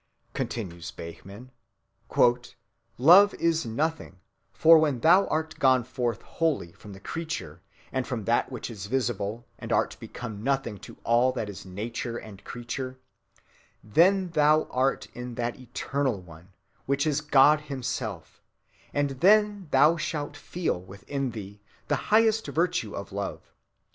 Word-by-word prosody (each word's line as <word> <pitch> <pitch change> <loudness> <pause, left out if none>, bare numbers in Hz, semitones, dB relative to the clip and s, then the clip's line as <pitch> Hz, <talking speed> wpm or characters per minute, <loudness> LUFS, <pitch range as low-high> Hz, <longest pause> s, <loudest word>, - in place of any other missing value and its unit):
"Love," - - -38
continues 85 -7 -4
Behmen, 100 +9 -10 1.9
is 165 -3 +1
Nothing, 145 - -2 0.3
for 165 0 +7
"when 145 -5 +1
thou 185 +5 +5
art 160 0 -2
gone 130 -2 +4
forth 120 -3 -3
wholly 155 - -1
from 100 +3 -13
the 95 - -11
Creature 125 - -5 0.3
and 130 -1 -2
from 120 -5 -3
that 120 +3 +1
which 125 -1 -5
is 100 -3 -7
visible, 115 -2 -2
and - - -7
art - - +1
become 110 -4 -7
Nothing 135 -6 -1
to - - -12
all 120 +2 +3
that 105 - -3
is 95 - -11
Nature 115 +5 -4
and 100 -4 -11
Creature, 130 +3 -6 0.9
then 180 - +3
thou 155 -1 +4
art 130 +2 +1
in 125 -1 -7
that 120 +1 -3
eternal 130 -1 -2
One, 85 0 -15 0.4
which 140 +2 +1
is 150 -1 +1
God 150 0 +5
himself, 125 - -5 0.5
and 145 -1 +1
then 205 0 +4
thou 150 +5 +5
shalt 150 -2 -3
feel 165 - -3
within 100 +9 -5
thee 105 -3 -9 0.3
the 145 - +3
highest 220 0 +4
virtue 165 - -1
of 100 - -7
Love.... 100 0 -6
130 Hz, 140 wpm, -27 LUFS, 105-155 Hz, 1.9 s, for